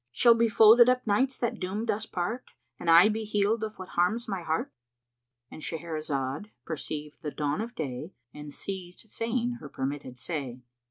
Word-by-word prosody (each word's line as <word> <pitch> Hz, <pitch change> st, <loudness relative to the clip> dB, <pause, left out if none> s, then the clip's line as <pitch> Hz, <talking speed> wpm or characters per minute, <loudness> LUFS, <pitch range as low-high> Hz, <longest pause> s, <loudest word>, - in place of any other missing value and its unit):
Shall 235 Hz, -, +6 dB
be 230 Hz, 0 st, +2 dB
folded 225 Hz, +3 st, +8 dB
up 250 Hz, 0 st, +2 dB
nights 260 Hz, +6 st, +2 dB
that 240 Hz, -, -2 dB
doomed 205 Hz, +5 st, -1 dB
us 215 Hz, +1 st, -3 dB
part 210 Hz, +7 st, -3 dB, 0.2 s
* -, -, -49 dB
And 170 Hz, -, -2 dB
I 170 Hz, +4 st, +9 dB
be 220 Hz, +1 st, -1 dB
healed 210 Hz, +1 st, +1 dB
of 215 Hz, 0 st, -5 dB
what 185 Hz, -, -8 dB
harms 200 Hz, +7 st, +1 dB
my 195 Hz, -4 st, -3 dB
heart?" 160 Hz, -1 st, -1 dB, 0.8 s
—And -, -, -9 dB
Shahrazad 155 Hz, 0 st, -3 dB, 0.2 s
perceived 150 Hz, -2 st, -5 dB
the 155 Hz, -, -3 dB
dawn 150 Hz, +4 st, -1 dB
of 235 Hz, +2 st, -6 dB
day 150 Hz, +3 st, -5 dB, 0.2 s
and 150 Hz, 0 st, -8 dB
ceased 185 Hz, +5 st, -7 dB
saying 240 Hz, +1 st, -1 dB
her -, -, -9 dB
permitted 135 Hz, -1 st, -4 dB
say. 130 Hz, -3 st, -5 dB
185 Hz, 175 wpm, -28 LUFS, 150-225 Hz, 0.8 s, I